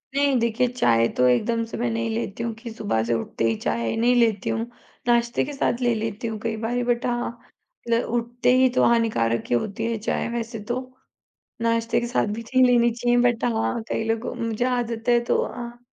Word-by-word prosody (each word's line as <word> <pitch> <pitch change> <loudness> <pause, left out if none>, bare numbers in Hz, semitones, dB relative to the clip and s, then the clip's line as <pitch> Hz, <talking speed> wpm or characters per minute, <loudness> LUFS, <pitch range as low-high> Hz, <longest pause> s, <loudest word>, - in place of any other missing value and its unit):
नहीं 280 -1 +3
देखिए 235 +2 +1
चाय 115 - +2
तो 125 - +4
एकदम 230 - +2
से 225 - -7
मैं 240 +1 0
नहीं 225 0 -1
लेती 225 0 -3
हूँ 230 - -2
कि 230 +1 -9
सुबह 205 - -1
से 120 - 0
उठते 115 0 -3
ही 115 - +1
चाय 115 +1 -1
नहीं 240 +2 +3
लेती 225 -5 +2
हूँ, 225 0 -1 0.4
नाश्ते 235 0 +2
के 290 - -6
साथ 255 -2 -1
ले 240 -1 +3
लेती 225 +1 -3
हूँ 220 -1 -4
कई 225 0 -2
बारी 245 +1 0
बट 240 0 0
हाँ, 240 -1 -2 0.5
ल 230 0 +3
उठते 240 +1 0
ही 260 0 +6
तो - - +4
हानिकारक 220 - +2
ही 120 - +3
होती 210 - -2
है 230 - -1
चाहे 215 - -2
वैसे 230 -1 -4
तो। 240 +4 -2 0.8
नाश्ते 230 0 +1
के 240 - -2
साथ 245 - +1
भी 230 - -5
नहीं 255 +3 +2
लेनी 240 -1 +4
चाहिए 240 +1 +1
बट 230 - -9
हाँ, 110 - 0
कई - - -1
लोगों 225 +1 -1
मुझे 230 +1 -1
आदत 240 -2 -1
है 240 0 +5
तो - - +2
हाँ, 240 -1 -7
230 Hz, 210 wpm, -24 LUFS, 220-240 Hz, 0.8 s, ही